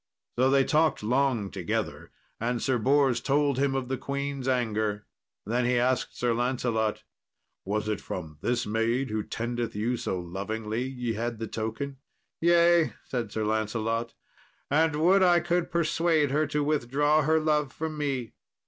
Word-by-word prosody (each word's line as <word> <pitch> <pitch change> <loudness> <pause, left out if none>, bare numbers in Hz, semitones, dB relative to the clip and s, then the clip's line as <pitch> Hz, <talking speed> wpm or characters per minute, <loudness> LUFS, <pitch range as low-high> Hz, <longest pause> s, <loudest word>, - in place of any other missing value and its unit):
So 130 +2 +3
they 135 0 +4
talked 155 -3 +2
long 125 -3 +1
together, 90 -4 -3 0.3
and 120 +1 -1
Sir 130 0 0
Bors 135 +1 +3
told 140 -1 +1
him 135 -1 +1
of 130 -2 -2
the 130 0 -3
queen's 140 -1 -3
anger. 110 -5 0 0.4
Then 120 +4 0
he 125 0 +2
asked 125 +1 0
Sir 120 -1 +1
Lancelot, 120 -3 -1 0.6
"Was 105 +2 -1
it 105 -2 -2
from 80 -4 -7
this 120 0 0
maid 115 +4 0
who 110 0 0
tendeth 120 +2 -3
you 115 +4 0
so 95 - -2
lovingly 105 +6 -4
ye 125 -3 -3
had 115 +1 -3
the 115 - -4
token?" 115 +6 -4 0.4
"Yea," 170 0 +4
said 120 -5 -3
Sir 110 -1 -2
Lancelot; 110 +2 -1 0.6
"and 160 +1 +3
would 180 +6 +4
I 175 -2 +5
could 175 +1 0
persuade 165 -3 +2
her 155 +2 +2
to 150 0 0
withdraw 145 +1 +2
her 160 +2 +3
love 150 -3 +1
from 160 0 -4
me." 135 -6 -2
125 Hz, 155 wpm, -27 LUFS, 110-145 Hz, 0.6 s, I